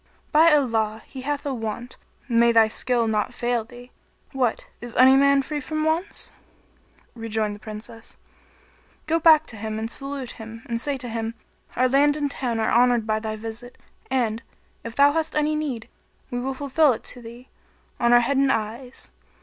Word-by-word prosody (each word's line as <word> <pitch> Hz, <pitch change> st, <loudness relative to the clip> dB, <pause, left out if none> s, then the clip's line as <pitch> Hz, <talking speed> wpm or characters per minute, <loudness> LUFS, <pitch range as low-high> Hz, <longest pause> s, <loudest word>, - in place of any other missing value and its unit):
By 325 Hz, +2 st, +6 dB
Allah, 225 Hz, -7 st, +1 dB
he 260 Hz, -, -9 dB
hath 290 Hz, +2 st, -3 dB
a 280 Hz, -, -1 dB
want, 230 Hz, +1 st, -5 dB, 0.3 s
may 235 Hz, -1 st, +4 dB
thy 225 Hz, -1 st, +5 dB
skill 235 Hz, +1 st, 0 dB
not 220 Hz, +3 st, -1 dB
fail 240 Hz, -1 st, 0 dB
thee. 245 Hz, +2 st, -14 dB, 0.4 s
What! 255 Hz, -4 st, -1 dB
is 240 Hz, -1 st, -8 dB
any 260 Hz, +1 st, +7 dB
man 280 Hz, 0 st, +4 dB
free 300 Hz, +2 st, -4 dB
from 310 Hz, +3 st, -3 dB
wants?" 325 Hz, +5 st, -1 dB, 0.8 s
Rejoined 220 Hz, -2 st, -2 dB
the 205 Hz, -, -10 dB
Princess, 215 Hz, +1 st, -10 dB, 0.9 s
"Go 325 Hz, +2 st, +1 dB
back 315 Hz, -1 st, +6 dB
to 225 Hz, -, -10 dB
him 215 Hz, +1 st, -4 dB
and 225 Hz, +1 st, -4 dB
salute 275 Hz, -1 st, -3 dB
him 225 Hz, 0 st, -10 dB
and 230 Hz, -1 st, -3 dB
say 285 Hz, +1 st, -1 dB
to 250 Hz, -1 st, -5 dB
him, 225 Hz, 0 st, -4 dB, 0.4 s
'Our 255 Hz, +1 st, +3 dB
land 285 Hz, +3 st, +3 dB
and 290 Hz, -2 st, -1 dB
town 240 Hz, -5 st, -2 dB
are 220 Hz, -, +1 dB
honoured 240 Hz, -1 st, +3 dB
by 215 Hz, 0 st, 0 dB
thy 215 Hz, 0 st, -4 dB
visit 225 Hz, +3 st, -8 dB, 0.3 s
and, 235 Hz, -4 st, 0 dB, 0.4 s
if 230 Hz, 0 st, -7 dB
thou 285 Hz, +1 st, +6 dB
have 320 Hz, +1 st, -1 dB
any 300 Hz, 0 st, +1 dB
need, 275 Hz, -7 st, -3 dB, 0.4 s
we 245 Hz, -, -2 dB
will 265 Hz, +2 st, -3 dB
fulfil 285 Hz, +1 st, +3 dB
it 220 Hz, -, -8 dB
to 245 Hz, -, -7 dB
thee, 235 Hz, +2 st, -12 dB, 0.5 s
on 235 Hz, 0 st, +3 dB
our 240 Hz, 0 st, +7 dB
head 265 Hz, +3 st, 0 dB
and 275 Hz, 0 st, +3 dB
eyes.' 230 Hz, +4 st, -4 dB
245 Hz, 180 wpm, -24 LUFS, 225-280 Hz, 0.9 s, any